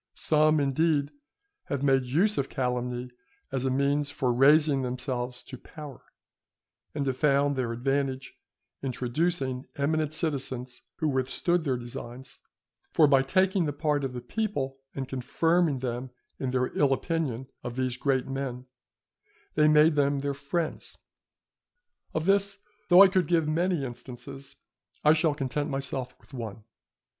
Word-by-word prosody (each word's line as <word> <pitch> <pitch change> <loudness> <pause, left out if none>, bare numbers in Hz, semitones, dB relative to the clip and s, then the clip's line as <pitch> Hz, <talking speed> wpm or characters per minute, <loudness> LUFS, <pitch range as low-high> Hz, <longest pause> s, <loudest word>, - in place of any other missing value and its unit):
Some, 155 0 +3
indeed, 145 +1 +1 0.5
have 140 -1 -3
made 135 -2 +3
use 180 +12 +2
of 135 - -1
calumny 125 -1 -2 0.4
as 135 -1 -2
a - - +2
means 140 +2 +1
for 130 -3 0
raising 145 +2 +5
themselves 125 -1 -3
to 130 -2 -10
power, 150 -3 -10 0.9
and 145 -2 -1
have 130 -2 -1
found 140 0 +3
their 125 -3 -1
advantage 135 +2 -1 0.5
in 135 - -2
traducing 130 0 -1
eminent 155 +1 0
citizens 135 -5 -2
who 160 - -1
withstood 145 +6 0
their 130 -3 +1
designs; 120 +2 -8 0.5
for 155 - +5
by 140 -2 +5
taking 185 +5 +2
the 145 - -2
part 145 -1 0
of 135 -2 -3
the 125 - -5
people, 135 - -3 0.2
and 135 -1 -3
confirming 160 +4 +1
them 125 0 -4 0.3
in 130 - -2
their 125 0 -1
ill 140 -2 +3
opinion 135 -5 -2 0.2
of 120 -1 -5
these 130 -1 -1
great 130 0 0
men, 135 -2 -4 0.9
they 150 - +4
made 155 +1 +6
them 140 -1 +2
their 140 +1 -1
friends. 140 +4 -3 1.2
Of 160 0 0
this, 200 +1 +2 0.3
though 180 +2 +9
I - - +8
could 185 -3 +1
give 165 -2 +2
many 170 -1 +1
instances, 135 +3 -9 0.5
I 150 - +7
shall 160 -2 +2
content 145 +1 -2
myself 135 -2 -3
with - - -21
one. 115 -3 -6
140 Hz, 145 wpm, -28 LUFS, 130-155 Hz, 1.2 s, though